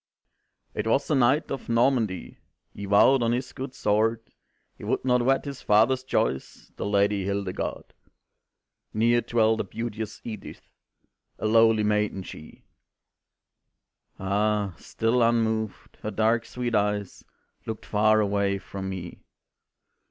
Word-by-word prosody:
"It 105 - -3
was 135 +7 +1
a - - +4
knight 130 +4 +2
of 135 -3 -5
Normandy, 115 -5 +1 0.3
He 100 - -7
vowed 105 +7 +5
on 115 0 +2
his 125 +1 -3
good 135 0 -6
sword 110 +2 0 0.4
He - - -14
would - - -1
not 125 -1 +3
wed 135 +3 +2
his 140 -2 -6
father's 115 +5 +3
choice, 65 - -2
The - - -4
Lady 100 -1 +2
Hildegarde. 100 -1 -3 1.0
"Near 120 +2 +3
dwelt 110 -2 +2
the - - 0
beauteous 110 +1 -5
Edith, 110 -3 -8 0.7
A - - -5
lowly 115 0 +4
maiden 105 -2 0
she 80 - -12 0.8
" - - -49
Ah! 100 0 0
still 115 +2 0
unmoved, 110 -2 0
her - - -3
dark 110 +2 +1
sweet 120 -1 -4
eyes 105 -2 -1 0.4
Looked 110 -1 -5
far 110 +1 +3
away 100 -1 +1
from 95 -1 -6
me. 90 -2 -7
110 Hz, 130 wpm, -26 LUFS, 100-120 Hz, 1.0 s, vowed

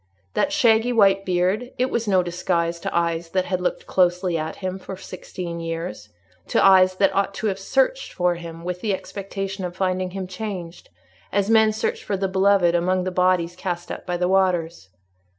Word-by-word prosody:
That 295 - +1
shaggy 240 -5 +3
white 195 -4 +4
beard—it 210 +8 0
was 230 -1 -1
no 190 -3 +3
disguise 170 -1 -1
to - - -2
eyes 170 0 -1
that 185 +1 0
had 185 0 -2
looked 180 - -2
closely 180 -1 +1
at 160 0 -3
him 185 0 -4
for 190 0 -8
sixteen 180 -2 -7
years—to 105 - -3
eyes 185 -1 +6
that 195 0 +2
ought 195 0 0
to - - -4
have 195 -2 0
searched - - 0
for 180 -1 +1
him 170 -1 -8
with 180 0 -4
the 205 -3 0
expectation 195 0 -6
of 175 -1 -4
finding 185 -1 0
him 190 +1 -5
changed, 185 -3 -7 0.4
as 200 +2 +1
men 220 -1 +5
search 215 - -2
for 200 - -2
the 195 0 0
beloved 190 -2 +3
among 180 +2 +1
the 185 - -2
bodies 180 -1 +1
cast 175 -2 -4
up - - -7
by 175 -1 -1
the 180 0 +1
waters. 175 - +1
185 Hz, 185 wpm, -23 LUFS, 175-195 Hz, 0.4 s, eyes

